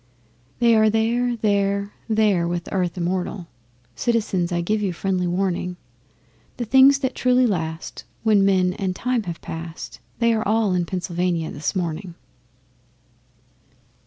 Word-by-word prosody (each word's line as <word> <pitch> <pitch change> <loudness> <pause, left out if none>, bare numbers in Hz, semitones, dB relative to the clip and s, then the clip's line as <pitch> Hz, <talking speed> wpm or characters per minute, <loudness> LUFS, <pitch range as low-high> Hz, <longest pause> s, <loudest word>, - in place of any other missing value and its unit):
They 235 -2 +4
are 220 0 +5
there, 235 +3 +1
there, 200 -2 0 0.2
there 210 -6 +2
with 175 0 -3
Earth 180 -2 -1
immortal 180 +1 -2 0.5
(Citizens, 200 - 0
I 175 - 0
give 210 +5 0
you 195 -3 -1
friendly 180 0 -1
warning). 180 0 -1 0.8
The 240 - -3
things 265 +4 +6
that 260 -2 -1
truly 255 0 +3
last 165 -6 -3 0.2
when 215 -3 +4
men 185 -2 +3
and 190 -1 -3
times 245 -3 -1
have 170 -1 -5
passed, 165 0 -7 0.2
They 235 -1 +3
are 220 - 0
all 215 -2 +2
in 175 -1 0
Pennsylvania 175 -2 -2
this 150 +7 -3
morning! 175 0 -3
195 Hz, 135 wpm, -22 LUFS, 175-220 Hz, 0.8 s, things